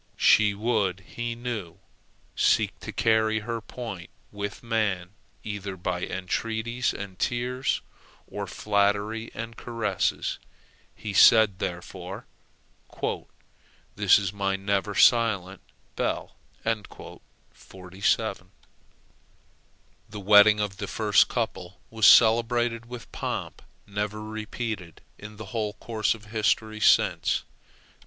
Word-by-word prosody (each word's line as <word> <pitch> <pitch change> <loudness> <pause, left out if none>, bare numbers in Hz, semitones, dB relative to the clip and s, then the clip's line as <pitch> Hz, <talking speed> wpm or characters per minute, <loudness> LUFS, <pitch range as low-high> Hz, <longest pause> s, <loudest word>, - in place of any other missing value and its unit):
She 105 -2 +5
would, 100 -4 0
he 120 +3 -5
knew, 115 -8 -5 0.6
seek - - +2
to - - -7
carry 110 -1 +2
her 115 +1 -4
point 110 -6 -7 0.2
with 100 +2 -6
man 105 -6 -1 0.3
either 100 -2 -5
by 90 0 -3
entreaties 115 +7 -2
and 95 -2 -8
tears, 125 +2 -1 0.4
or - - -6
flattery 105 +2 0
and 115 0 -6
caresses. 110 -6 -2 0.6
He 105 -2 -6
said, 105 -1 +6
therefore, 90 +1 -6 1.7
"This 105 -3 +5
is 100 -1 -2
my 100 -1 -1
never 100 +1 -1
silent 100 -6 +3 0.3
bell!" - - -2 0.3
The 110 -3 -4 3.0
wedding 105 +1 +6
of 105 -2 -2
the - - -4
first - - +3
couple 90 +1 -4
was 110 -2 +4
celebrated 115 0 +5
with 120 -1 -9
pomp - - -4 0.2
never 105 +1 -4
repeated 110 -4 -5 0.2
in 105 +1 -10
the 110 - -7
whole 105 -3 -1
course 110 +1 -1
of 110 -1 -15
history 110 0 0
since. - - +3
105 Hz, 105 wpm, -26 LUFS, 100-115 Hz, 3.0 s, said